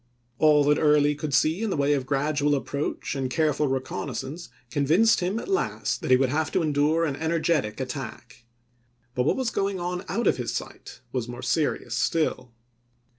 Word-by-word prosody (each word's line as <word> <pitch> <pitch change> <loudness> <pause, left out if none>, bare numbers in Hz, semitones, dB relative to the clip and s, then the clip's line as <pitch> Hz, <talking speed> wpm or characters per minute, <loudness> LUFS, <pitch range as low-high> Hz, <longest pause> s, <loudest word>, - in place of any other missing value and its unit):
All 150 -1 +5
that 150 +1 +3
Early 150 -1 +4
could 150 0 -5
see 160 +7 +2
in 225 - -1
the 190 - -1
way 140 +1 +2
of 135 -2 -2
gradual 145 +1 +1
approach 140 +1 -3
and 135 -2 -2
careful 150 +1 +1
reconnaissance 135 +4 -4 0.2
convinced 160 - +3
him 185 +4 -1
at - - -5
last 390 +1 -1
that - - -4
he 130 - +7
would 130 0 +1
have 155 +3 -1
to - - +2
endure 155 +2 +2
an 145 -4 -2
energetic 160 -7 0
attack; 125 -3 -7 0.7
but 125 0 0
what - - +2
was 255 -3 -1
going 195 -1 -1
on 180 +1 -3
out 235 - -1
of - - +3
his 125 -2 -3
sight - - -7
was 125 -3 -2
more 120 0 -8
serious 155 -3 0
still. 130 -6 0
150 Hz, 180 wpm, -26 LUFS, 135-165 Hz, 0.7 s, he